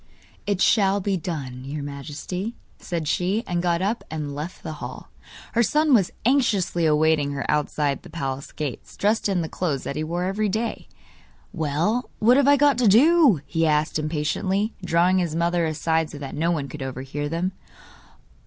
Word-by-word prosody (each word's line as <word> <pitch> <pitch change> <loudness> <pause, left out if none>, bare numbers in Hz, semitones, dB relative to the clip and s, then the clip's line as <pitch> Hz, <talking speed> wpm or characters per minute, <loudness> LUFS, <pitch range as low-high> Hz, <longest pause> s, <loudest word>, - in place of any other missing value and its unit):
'It 200 -2 0
shall 200 -1 +4
be 200 0 0
done, 140 -8 -5
your 145 +2 -5
Majesty,' 150 - -5 0.2
said 165 -3 -4
she, 190 +8 0
and 175 -1 -1
got 175 0 +1
up 215 +4 -1
and 150 -2 -4
left 150 +5 -6
the - - -4
hall. - - -8 0.4
Her 235 - +3
son 300 +5 +3
was 200 -7 +4 0.2
anxiously 205 - +2
awaiting 150 -1 +2
her 140 - -3
outside 150 -1 0
the 180 - -13
palace 135 -4 -4
gates, 145 -4 -6
dressed 210 +1 +1
in 180 -3 +1
the - - -3
clothes 155 -6 -2
that - - -4
he 155 - -2
wore 170 +3 -2
every 200 +3 0
day. 225 +4 -3 0.7
'Well, 165 - 0
what 235 +4 +5
have 280 0 +4
I 285 0 +6
got 285 -2 +4
to 240 - +4
do?' 265 - +6
he 165 +3 0
asked 150 0 +1
impatiently, 165 +7 -1
drawing 180 +2 +3
his 170 -3 -1
mother 170 0 +1
aside 160 +1 0
so 145 - -9
that 140 -2 -7
no 160 +3 0
one 155 -5 -1
could 145 +2 -9
overhear 135 +3 -4
them. 170 +4 -1
170 Hz, 180 wpm, -24 LUFS, 150-200 Hz, 0.7 s, I